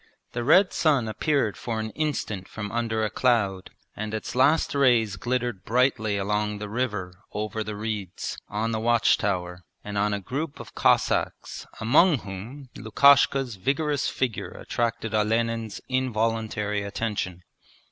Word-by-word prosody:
The 120 - -3
red 180 +8 +5
sun 140 -8 +2
appeared 120 -1 0
for 115 -2 -4
an 110 0 -4
instant 110 -11 -3
from 105 -2 -6
under 115 -2 -1
a - - -1
cloud 105 -6 +1 0.3
and 110 +1 -4
its 110 - -5
last 140 +6 +3
rays 120 -7 +3
glittered 120 0 -2
brightly 110 -3 +1
along 105 +1 -1
the 105 0 -5
river 105 -6 -2 0.2
over 110 +1 -3
the 105 0 -5
reeds, 105 -4 -4
on 110 +2 -1
the 110 - -1
watch 120 0 +3
tower, 90 -3 -2 0.2
and 105 -1 -3
on 105 +1 +2
a 100 - -1
group 140 - -4
of - - -10
Cossacks, - - +1
among 145 +8 +5
whom 115 +8 -8
Lukashka's 135 0 +4
vigorous 140 +7 0
figure 125 -5 -2
attracted 115 -1 -3
Olenin's 115 0 0
involuntary 110 -4 -1
attention. 100 -3 -3
110 Hz, 140 wpm, -26 LUFS, 105-125 Hz, 0.3 s, red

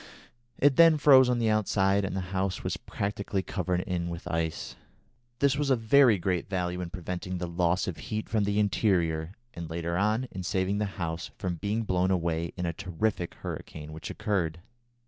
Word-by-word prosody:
It 140 -1 +4
then 165 -2 +7
froze 135 -3 +7
on 125 - +2
the 115 -2 +2
outside, 100 -2 +2
and 95 - -3
the - - -1
house 95 -1 -1
was - - -1
practically 100 -1 -3
covered 90 -2 -1
in 85 -2 -2
with 85 0 -6
ice. 80 -1 -2 0.6
This 140 +1 +2
was 145 -1 0
of 130 -3 +3
very 115 0 +5
great 90 0 -1
value 90 -2 -2
in 90 - -4
preventing 90 0 -5
the 90 - -3
loss 85 +1 +1
of 90 - -3
heat 110 0 -4
from 110 -2 +1
the 100 +1 +1
interior, 90 -6 +1 0.2
and, 85 -1 -7
later 85 +1 -2
on, 110 +5 +1
in 95 - -5
saving 95 +2 0
the 105 - +1
house 85 -1 -3
from 90 -2 -3
being 105 +6 -1
blown 95 -2 +1
away 85 -2 0
in 90 - -2
a 85 - -1
terrific 90 +1 -2
hurricane 75 0 -7
which 80 - -7
occurred. 90 -7 -1
95 Hz, 185 wpm, -28 LUFS, 85-105 Hz, 0.6 s, then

